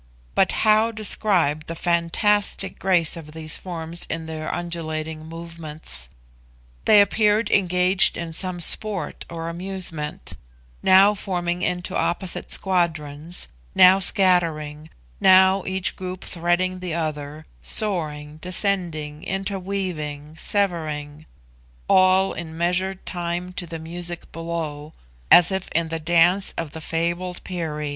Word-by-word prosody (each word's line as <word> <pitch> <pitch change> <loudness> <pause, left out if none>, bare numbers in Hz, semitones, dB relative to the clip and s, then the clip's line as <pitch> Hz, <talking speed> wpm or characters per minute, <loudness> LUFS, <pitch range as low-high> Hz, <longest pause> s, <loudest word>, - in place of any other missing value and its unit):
But 190 - +3
how 215 +1 +4
describe 190 -8 +1
the 165 - -5
fantastic 190 +4 +1
grace 175 -4 +2
of 155 -2 -10
these 155 -1 -4
forms 170 -2 -6
in 165 0 -3
their 155 -1 -5
undulating 160 -2 -4
movements! 165 - -4 0.8
They 210 - +7
appeared 210 +1 +2
engaged 180 -1 +3
in 165 -1 -5
some 180 +1 -3
sport 195 -1 0
or 165 -1 -5
amusement; 170 -3 -3 0.5
now 190 +2 +6
forming 180 -3 -3
into 180 0 -2
opposite 175 +1 -2
squadrons; 165 -3 0 0.3
now 185 +1 +7
scattering; 165 -6 +1 0.3
now 190 0 +6
each 190 0 -1
group 185 0 -6
threading 180 +1 0
the 180 -3 -4
other, 155 -1 -4 0.2
soaring, 155 -8 0
descending, 170 -4 -2
interweaving, 185 -6 -4
severing; 155 -6 -2 0.6
all 185 +1 +4
in 160 -2 -7
measured 180 +2 -1
time 175 0 -4
to 180 -1 -5
the 165 0 -6
music 170 +1 -5
below, 160 -3 -5 0.4
as 175 +1 +8
if 190 -1 -3
in 165 0 +1
the 165 0 -3
dance 175 +4 +3
of 165 -3 -4
the 160 - -8
fabled 170 +3 -2
Peri. 155 -5 -4
175 Hz, 120 wpm, -23 LUFS, 160-185 Hz, 0.8 s, as